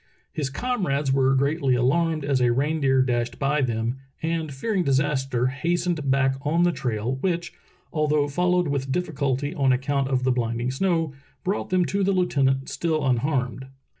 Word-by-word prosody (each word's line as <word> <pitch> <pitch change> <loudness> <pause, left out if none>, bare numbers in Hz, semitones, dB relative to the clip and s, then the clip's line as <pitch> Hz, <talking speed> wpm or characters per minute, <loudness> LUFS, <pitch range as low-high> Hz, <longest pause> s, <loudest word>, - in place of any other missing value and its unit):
His 145 -3 -2
comrades 145 - -1
were 135 0 +3
greatly 140 -1 +1
alarmed 155 +5 +1
as 135 -2 +1
a 120 -1 +4
reindeer 135 0 +2
dashed 120 -2 -1
by 140 +2 +1
them, 115 0 -1 0.3
and 160 -2 -1
fearing 185 +8 -1
disaster 135 -3 +1
hastened 165 +2 -1
back 135 0 +2
on 160 +4 +1
the 175 - +4
trail, 125 -3 -2
which, 170 +1 -2 0.4
although 150 -2 +2
followed 180 +4 +1
with 135 -2 -2
difficulty 145 -3 -1
on 135 -6 +2
account 135 +1 0
of 130 -1 0
the 130 - +2
blinding 120 0 -1
snow, 165 0 0 0.3
brought 195 +2 -2
them 185 -1 +2
to 200 +2 0
the 195 +1 +2
lieutenant 135 -7 +1
still 155 +1 -1
unharmed. 130 0 0
140 Hz, 160 wpm, -24 LUFS, 130-165 Hz, 0.4 s, a